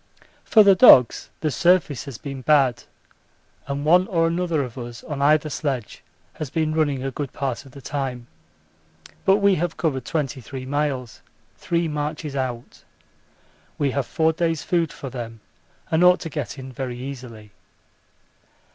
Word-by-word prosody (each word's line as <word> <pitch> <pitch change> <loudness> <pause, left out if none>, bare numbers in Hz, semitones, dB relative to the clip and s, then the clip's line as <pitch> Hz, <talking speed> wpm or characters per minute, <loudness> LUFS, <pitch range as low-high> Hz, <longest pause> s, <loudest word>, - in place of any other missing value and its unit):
For 215 - +6
the 200 -1 +7
dogs 135 - +6
the 155 - 0
surface 175 -6 +2
has 135 -5 -7
been 135 0 -7
bad, 135 -3 +2 0.8
and 140 +1 -3
one 180 +4 +5
or 165 -3 +1
another 170 -3 0
of 125 -3 -8
us 120 -2 -8
on 145 -3 -5
either 150 +2 +4
sledge 135 -6 -4 0.3
has 155 -4 -6
been 155 +2 -1
running 145 -4 0
a 135 - -2
good 140 0 -5
part 135 -1 -4
of 130 - -17
the 140 - -12
time. 130 -4 -4 1.0
But 195 +1 +5
we 200 -1 +4
have 175 -1 -2
covered 135 -6 -1
23 135 -2 -4
miles: 135 -3 -2 0.3
three 170 -1 -1
marches 150 -1 -4
out. 125 -3 -5 0.9
We 140 -2 +1
have 140 -1 -2
four 160 0 +1
days' 165 -1 -1
food 170 -4 0
for 135 - -8
them 115 -3 -7 0.5
and 160 +2 +3
ought 180 0 +6
to 165 - -5
get 145 -3 -4
in 130 0 -8
very 125 -1 -5
easily. 125 -5 -9
140 Hz, 155 wpm, -23 LUFS, 130-160 Hz, 1.0 s, the